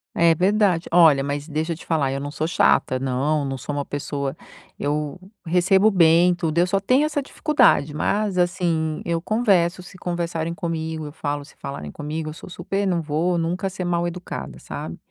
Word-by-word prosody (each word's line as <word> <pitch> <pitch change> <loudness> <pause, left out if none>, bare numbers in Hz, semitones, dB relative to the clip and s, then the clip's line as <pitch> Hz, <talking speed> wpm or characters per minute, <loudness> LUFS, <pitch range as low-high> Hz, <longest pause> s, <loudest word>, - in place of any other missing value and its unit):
É 170 0 +5
verdade. 185 0 +2
Olha, 160 -5 +6
mas 145 +1 -3
deixa 160 +2 -2
eu - - -7
te - - -13
falar, 150 -5 +1
eu 135 - -2
não 145 +1 -5
sou 155 +1 -2
chata, 145 -6 +2
não, 135 +3 0
não 135 -1 -3
sou 140 +3 -5
uma 145 -1 -2
pessoa 140 -1 -4 0.4
eu 150 +3 -2 0.3
recebo 190 +5 +4
bem 175 -1 +5
tudo. 165 -2 -2
Eu 175 +1 +4
só 195 +2 +1
tenho 255 +9 +3
essa 300 -1 -1
dificuldade, 270 - +2
mas, 200 +5 0
assim, 170 -3 0
eu 170 -1 -1
converso 190 -4 +2
se 180 +1 -13
conversarem 170 -2 -3
comigo, 160 -2 -4
eu 145 - -7
falo 145 -1 -3
se - - -18
falarem 75 - -7
comigo, 155 - -5
eu - - -6
sou 160 - -11
super 195 +3 -3
não 175 -3 +1
vou 165 +3 0
nunca 175 +3 -1
ser 185 -1 -5
mal-educada, 170 - -3
sabe. - - -7
165 Hz, 185 wpm, -23 LUFS, 150-180 Hz, 0.4 s, Olha